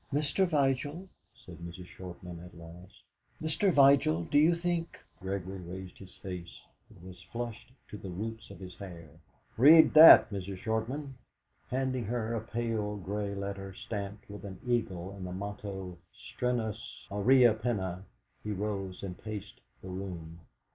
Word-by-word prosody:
"Mr. 150 +6 +2
Vigil," 145 +3 0 0.3
said 85 -3 -13
Mrs. 85 +2 -8
Shortman 90 -1 -9
at 90 - -13
last, 85 +2 -13 0.4
"Mr. 160 +5 +1
Vigil, 135 - +5
do 145 - +3
you 165 +3 +5
think 170 -1 -2
" - - -35
Gregory 95 0 -4
raised 90 +1 -8
his 95 -1 -13
face; 90 -3 -7 0.3
it - - -17
was 90 -1 -11
flushed 120 0 -5 0.2
to 105 - -8
the 95 - -7
roots 110 +5 -6
of - - -11
his 90 -1 -9
hair. 85 -6 -9 0.5
"Read 155 +7 +8
that, 155 -7 +11
Mrs. 95 -1 -5
Shortman." 120 +7 -3 0.6
Handing 130 -2 -1
her 115 +1 -2
a 115 - -1
pale 110 -2 -2
grey 100 +1 -3
letter 100 -1 -5
stamped 100 0 -6
with 105 0 -9
an 95 -2 -8
eagle 95 -7 -1
and 100 -1 -9
the 90 - -5
motto 95 -2 -6 0.2
'.trenuus 115 -3 -3
aureaque 115 +2 +5
penna' 95 -6 -2 0.4
he 105 - -5
rose 100 -2 -3
and 90 -2 -6
paced 105 -2 -7 0.2
the 95 - -7
room. 90 -3 -6
100 Hz, 150 wpm, -31 LUFS, 95-120 Hz, 0.6 s, that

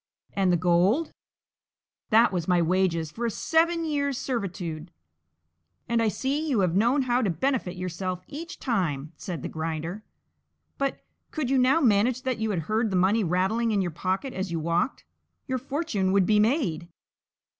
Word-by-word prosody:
"And 190 -2 +2
the 175 - +3
gold?" 180 - +2 1.0
"That 225 0 +5
was 175 -3 -2
my 180 -1 +3
wages 170 -2 +1
for 235 +6 -2
a - - +1
seven 330 +7 +1
years' 285 -3 -1
servitude." 180 - -4 1.0
"And 235 0 +1
I 225 - +2
see 280 +8 -1
you 240 -8 +2
have 180 -2 +1
known 240 +7 +3
how 250 0 +1
to 215 - +1
benefit 205 - -1
yourself 180 0 -4
each 330 +4 -7
time," 165 - -1
said 175 -3 -6
the - - -2
Grinder; 165 +5 -4 0.8
"but, 275 0 -2 0.2
could 285 -5 -2
you 270 - +4
now 265 +6 +4
manage 240 +1 +3
that 255 -3 -1
you 220 0 -1
heard 215 +5 0
the 190 - -2
money 195 +5 +3
rattling 190 +7 +1
in 205 -3 +2
your 175 - -2
pocket 190 - -2
as 190 -1 -3
you 165 - -1
walked, 170 - -1 0.4
your 260 -2 -2
fortune 265 - -1
would 195 -2 +4
be 210 +1 +3
made." 210 - +1
210 Hz, 165 wpm, -26 LUFS, 180-255 Hz, 1.0 s, That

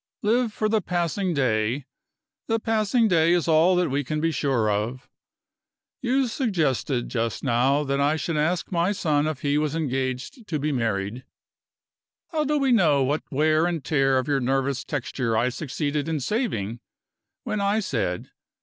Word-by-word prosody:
Live 230 +2 +2
for 215 +1 -1
the 215 0 +1
passing 180 +2 -1
day: 125 -2 0 0.6
the 225 0 +1
passing 225 +1 +2
day 170 -3 +4
is 175 -1 +1
all 165 +3 +4
that 180 -5 +1
we 140 +2 0
can 155 +3 -2
be 165 +1 +1
sure 130 -6 0
of. 110 +5 -2 0.9
You 260 +1 +1
suggested, 160 - 0
just 115 -4 -2
now, 135 +3 +2
that 140 0 -1
I 145 +2 +3
should 160 +1 -2
ask 160 +4 0
my 175 +3 +1
son 150 -5 +1
if 155 -4 -4
he 145 0 +1
was 155 0 -1
engaged 135 - -3
to 155 - -1
be 150 +1 -1
married. 115 -2 -2 1.1
How 310 -3 0
do 300 +1 +1
we 275 -2 +2
know 155 - +4
what 145 +4 0
wear 155 +3 +3
and 170 -5 -3
tear 135 -3 +2
of 130 - -1
your 140 -2 +2
nervous 135 +1 0
texture 125 -4 -2
I 120 +3 +2
succeeded 145 +3 -3
in 160 -2 -1
saving 125 - -2 0.6
when 215 - -2
I 200 +2 +2
said. 110 - -2
150 Hz, 170 wpm, -25 LUFS, 130-180 Hz, 1.1 s, day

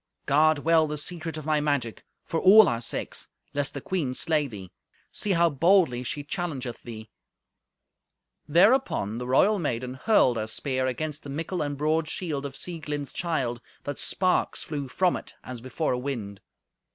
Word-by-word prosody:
"Guard 155 +2 +4
well 160 +1 +3
the 150 0 -4
secret 165 +1 -5
of 155 - -7
my 155 -1 +2
magic, 140 -6 -1 0.2
for 165 - -1
all 205 +4 +8
our 115 0 -1
sakes, 115 - -4 0.3
lest 145 0 -1
the 140 - -4
queen 150 -8 -2
slay 155 -2 +1
thee. 100 -7 -9 0.4
See 205 - -1
how 170 -1 +3
boldly 165 -4 +3
she 145 +3 -4
challengeth 140 -6 -4
thee." 110 -2 -9 1.4
Thereupon 170 - +3
the 125 - -5
royal 195 +11 +4
maiden 125 -5 -2
hurled 130 - +3
her 110 0 -2
speak 130 +4 -2
against 145 +4 -2
the 145 - -10
mickle 165 +6 -3
and 145 -1 -2
broad 155 +2 +1
shield 150 -7 -2
of 135 - -11
Sieglind's 150 -5 -4
child, 135 -9 -2 0.2
that 145 -1 -4
sparks 185 -1 +1
flew 145 -3 -4
from 180 +7 +1
it, - - -8
as 125 -2 -7
before 130 +5 -1
a 125 - -1
wind. 115 -7 -5
145 Hz, 165 wpm, -26 LUFS, 125-165 Hz, 1.4 s, all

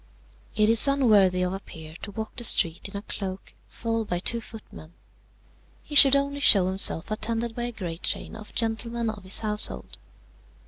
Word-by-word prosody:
"It 215 0 +2
is 225 +4 +8
unworthy 210 -10 +2
of 180 0 -3
a 195 - -5
peer 160 -4 -13
to - - -8
walk 220 +2 -8
the 240 - -4
street 170 -4 +3
in 200 - -7
a 200 - -8
cloak, 195 -3 -7 0.2
followed 225 -1 -4
by 175 - -2
two 230 +6 +1
footmen. 215 -7 -14 0.9
He - - -12
should 280 -1 +6
only 280 0 -2
show 200 -9 +4
himself 190 -1 +1
attended 225 +2 -4
by 240 +1 -5
a 240 - -4
great 175 -6 -7
train - - -3
of 215 -1 -13
gentlemen 230 0 -2
of 210 -3 -12
his 190 +1 +1
household. 210 -1 -1
215 Hz, 180 wpm, -24 LUFS, 190-230 Hz, 0.9 s, is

